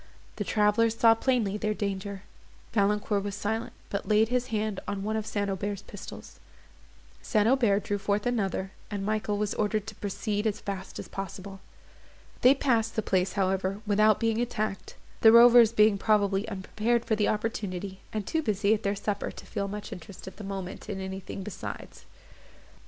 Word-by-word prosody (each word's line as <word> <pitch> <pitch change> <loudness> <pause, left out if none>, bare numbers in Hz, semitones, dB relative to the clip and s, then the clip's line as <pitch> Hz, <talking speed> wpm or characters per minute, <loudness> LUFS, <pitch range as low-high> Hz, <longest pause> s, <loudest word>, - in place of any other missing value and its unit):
The - - -1
travellers 220 +2 +2
saw 230 -1 +7
plainly 225 -4 0
their 215 0 -1
danger. 200 -1 -4 0.5
Valancourt 205 -1 +1
was 200 -1 -4
silent, 220 +2 -3 0.2
but 200 - -3
laid 215 +1 +4
his 250 0 0
hand 215 -3 -2
on 200 -1 -3
one 215 +1 -1
of 220 -1 -2
St. 205 -1 -1
Aubert's 200 +1 -3
pistols; 205 - -10 0.8
St. 210 -1 +2
Aubert 230 -6 +3
drew 205 0 -2
forth 205 +1 0
another, 195 -5 -1 0.2
and 200 -2 -3
Michael 215 -1 -1
was 210 0 -1
ordered 210 0 0
to 225 - -7
proceed 205 +1 -2
as 215 -1 -1
fast 195 -1 -6
as - - -6
possible. 195 0 -7 0.8
They 255 +3 +7
passed 230 -5 +1
the 220 - 0
place, 185 -2 +1
however, 190 0 0
without 215 0 +4
being 225 0 +1
attacked; 215 -4 -3 0.2
the 220 - +8
rovers 235 -1 +8
being 210 -3 +4
probably 205 0 +2
unprepared 220 +4 -1
for 220 - +1
the 210 -1 +1
opportunity, 200 -3 -3
and 215 -2 -3
too 320 - 0
busy 210 -4 +2
about 220 - -1
their 200 -1 0
supper 205 0 -2
to - - -11
feel 200 - -3
much 205 +1 -6
interest, 185 +2 -11
at 190 - -9
the 215 - -8
moment, 195 -2 -6
in 195 - -3
anything 190 0 -6
besides. 210 - -8
210 Hz, 175 wpm, -28 LUFS, 195-220 Hz, 0.8 s, the